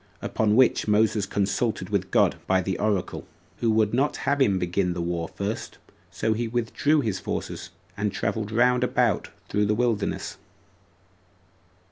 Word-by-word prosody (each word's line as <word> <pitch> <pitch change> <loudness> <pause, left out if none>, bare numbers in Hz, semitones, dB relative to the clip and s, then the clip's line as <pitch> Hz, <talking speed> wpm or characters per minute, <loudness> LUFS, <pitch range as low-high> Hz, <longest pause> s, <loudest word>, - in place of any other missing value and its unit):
Upon 105 -1 +1
which 130 -2 +4
Moses 105 -1 +2
consulted 100 -1 -1
God - - +3
by 95 -1 +2
the 95 0 -2
oracle, 105 -4 -1 0.3
who 115 - 0
would 110 -1 +2
not 135 +4 +1
have 140 0 +1
him 100 -7 +4
begin 90 0 0
the 85 - -5
war 85 -1 -2
first; 100 +6 -4
and - - -27 0.3
so 110 - 0
he 115 +2 -2
withdrew 120 +6 +1
his 105 -7 -2
forces, - - -5 0.3
and 100 0 -1
traveled 105 +2 -2
round 125 +2 +3
about 125 - +1 0.2
through 105 0 +1
the 105 - +2
wilderness. 115 -3 -1
105 Hz, 150 wpm, -25 LUFS, 100-115 Hz, 0.3 s, which